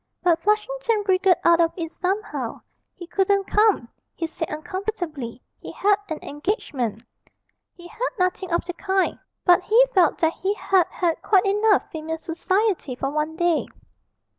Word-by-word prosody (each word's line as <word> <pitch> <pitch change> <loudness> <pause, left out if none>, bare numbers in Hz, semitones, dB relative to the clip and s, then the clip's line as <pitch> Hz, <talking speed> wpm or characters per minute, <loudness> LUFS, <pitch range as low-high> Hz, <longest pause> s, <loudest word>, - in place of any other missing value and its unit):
But 345 -2 +3
Flushington 435 +1 0
wriggled 375 -1 +4
out 340 0 +5
of 330 0 +3
it 330 -2 -4
somehow. 390 +4 -3 0.3
He 355 - -9
couldn't 395 +2 +1
come, 420 - +3 0.3
he 330 - -2
said 325 0 -5
uncomfortably; 310 - -5 0.2
he - - -8
had 405 0 +3
an 315 - -3
engagement. 285 - -3 0.7
He 345 - -14
had - - -18 0.2
nothing 365 0 -1
of 340 0 0
the 355 - -4
kind, 380 +1 0 0.3
but 355 0 +6
he 450 +6 +5
felt 370 -3 +4
that 325 0 +1
he 395 +2 -2
had 380 -4 +2
had 340 -3 -1
quite 395 -1 +3
enough 415 +1 +3
female 320 0 -4
society 350 - -1
for 270 +2 -3
one 305 +1 -2
day. 345 -1 +1
360 Hz, 155 wpm, -23 LUFS, 325-400 Hz, 0.7 s, but